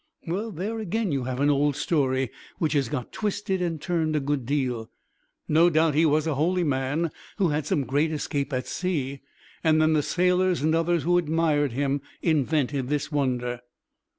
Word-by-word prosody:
"Well, 195 +7 -2
there 210 +4 -4
again 220 -1 -1
you 135 -3 -1
have 130 0 -3
an 145 +1 +4
old 145 0 +2
story 135 -5 0 0.3
which 160 -2 0
has 140 -5 +1
got 125 -3 -4
twisted 205 -2 -2
and 170 -3 -1
turned 160 -1 0
a - - +3
good 140 -3 -2
deal. 125 -5 -1 0.6
No 165 +3 +5
doubt 160 -1 +3
he 160 +3 +4
was 150 +1 +2
a 160 - 0
holy 175 +6 +1
man 145 +3 0 0.3
who 190 -5 +2
had 150 0 -1
some 145 - +1
great 145 +5 +1
escape 145 -2 -2
at 130 -1 -2
sea, 140 -7 -2 0.4
and 160 -1 +4
then 155 0 +4
the 155 - +3
sailors 180 0 +1
and 160 +1 +2
others 165 0 +1
who 175 +1 +3
admired 155 -4 +1
him 140 +2 0 0.2
invented 145 -4 +1
this 150 +1 -1
wonder." 125 -4 -1
150 Hz, 180 wpm, -26 LUFS, 140-170 Hz, 0.6 s, No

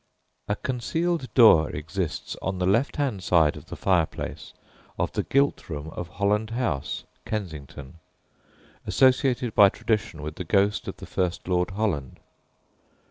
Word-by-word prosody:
A 105 - 0
concealed 130 - -2
door 95 - +7
exists 80 +2 -4
on 95 0 -2
the 90 - 0
left 115 +9 +2
hand 130 -10 -1
side 80 -4 +3
of 75 +2 -11
the - - -7
fireplace 90 -5 -1 0.5
of - - -1
the - - -1
gilt 140 -6 +1
room 75 -1 -5
of 85 - -6
Holland 105 +3 0
House, 115 - -2 0.2
Kensington, 80 -7 -6 0.9
associated 130 -3 +3
by 100 -1 +7
tradition 100 -8 -2
with 75 +1 -6
the - - -3
ghost 100 +4 +1
of - - -5
the - - -9
first 90 -1 -2
Lord 90 -1 +1
Holland. 95 - -2
95 Hz, 140 wpm, -25 LUFS, 80-115 Hz, 0.9 s, door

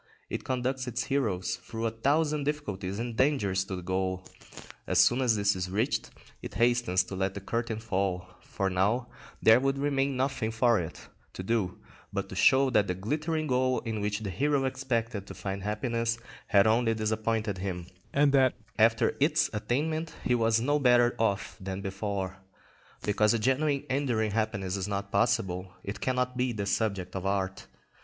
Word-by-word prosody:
It - - -3
conducts 130 0 -2
its 120 -1 -2
heroes 115 -10 -1
through 115 0 -5
a 115 - +1
thousand 145 +5 +1
difficulties 105 -11 -3
and 115 0 -4
dangers 110 -8 +2
to 95 - -4
the 90 - -6
goal; 95 +1 -2 0.6
as - - +1
soon 120 +2 +5
as 120 -4 +3
this 100 -1 +2
is 90 0 -3
reached, 110 +9 0 0.3
it - - -8
hastens 120 -6 +3
to 95 - -7
let 95 0 -1
the - - -3
curtain 115 +3 -2
fall; 95 -4 -1 0.2
for 100 - -2
now 105 +7 +1 0.3
there 110 +2 +7
would 135 +1 0
remain 140 -1 0
nothing 130 -4 0
for 115 0 +3
it 80 -3 -7 0.3
to 95 - -6
do 95 -3 0 0.3
but - - -3
to - - -7
show 130 0 +5
that 105 -3 +3
the 90 - -1
glittering 155 - -1
goal 130 -2 +1
in 110 -3 -3
which 105 +1 -1
the 100 -3 -3
hero 140 - +1
expected 120 -6 -2
to 95 - -8
find 95 +1 -4
happiness 115 +3 -1 0.3
had 100 -1 +5
only 115 +1 +3
disappointed 110 -2 -1
him, 90 -2 -4 0.3
and 140 0 +4
that 135 -2 +4 0.2
after 115 +1 +4
its 155 +2 +3
attainment 155 +10 -1
he 125 - +2
was 115 -1 +3
no 145 +5 +1
better 120 -2 +4
off 105 -3 0
than 95 0 -4
before. 95 -1 -3 0.7
Because 105 +2 +3
a - - +2
genuine 135 +4 +1
enduring 120 -6 0
happiness 100 -3 -1
is 95 0 -3
not 100 0 -3
possible, 100 -4 0
it 100 - -6
cannot 125 0 0
be 125 -1 0
the 105 -2 -3
subject 100 -4 -1
of 95 - -3
art. 95 -1 -2
115 Hz, 175 wpm, -29 LUFS, 100-130 Hz, 0.7 s, there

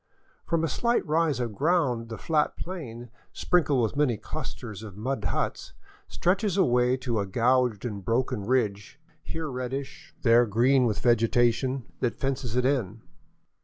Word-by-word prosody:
From 165 -1 +1
a - - +2
slight 235 - 0
rise 155 -4 +1
of 120 -3 -2
ground 135 - +1
the 110 - -6
flat 155 -2 0
plain, 120 -10 -7 0.2
sprinkled 150 -8 +2
with 110 - -1
many 140 -6 +2
clusters 110 0 -7
of 105 -3 -10
mud 125 +1 -3
huts, - - -2 0.3
stretches 190 +2 0
away 125 -7 +3
to 120 -4 -2
a 100 - -2
gouged 120 +1 +1
and 100 -5 -5
broken 120 0 0
ridge, 105 0 -1 0.2
here 160 +1 -5
reddish, 135 +1 -6
there 120 -1 +5
green 125 +4 +3
with 105 - -1
vegetation, 120 +2 +2 0.2
that 120 -2 -1
fences 130 -3 -2
it 125 0 +2
in. 115 -6 -1
125 Hz, 150 wpm, -27 LUFS, 115-140 Hz, 0.3 s, there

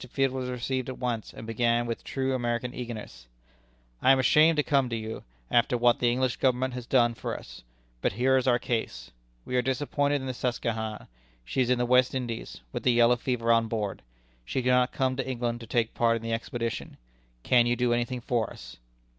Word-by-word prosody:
Field 135 +1 +1
was 130 -1 -3
received 125 +1 -2
at 130 - -6
once, 120 -3 -3
and - - -10
began 120 +1 +1
with 115 -1 -4
true 135 0 -2
American 120 0 -2
eagerness: 110 - -7 0.7
"I 130 - +6
am 135 - +6
ashamed 155 +5 +5
to 150 - +3
come 135 -3 +2
to 115 - -2
you, 110 0 -5 0.3
after 120 +1 +3
what 120 0 +3
the 120 - +3
English 130 0 0
Government 130 0 +1
has 125 -1 -6
done 120 -3 +3
for - - -4
us. - - -12 0.4
But - - 0
here 130 +5 +2
is 130 0 +1
our 120 -1 +5
case. 120 -2 -3 0.3
We 125 - -4
are - - +4
disappointed 145 +2 0
in 135 - -6
the 130 - -3
Susquehanna. 115 -3 -3 0.4
She 130 - -1
is 125 - +1
in 125 - +3
the 125 - +1
West 125 +1 +3
Indies, 120 - -5
with - - -4
the 125 - +3
yellow 120 +1 +5
fever 120 -1 0
on 115 -1 +3
board. 105 -3 -3 0.4
She 125 - -2
cannot 125 0 +3
come 130 -1 0
to 135 0 -2
England 120 -2 -2
to 115 - -10
take 115 0 0
part 115 -1 +2
in 115 - -5
the 115 0 -2
expedition. 115 0 -4 0.5
Can 120 -1 +4
you 120 - +2
do 120 -1 +1
anything 120 +1 -1
for 120 -2 -1
us?" - - -11
120 Hz, 210 wpm, -27 LUFS, 115-130 Hz, 0.7 s, I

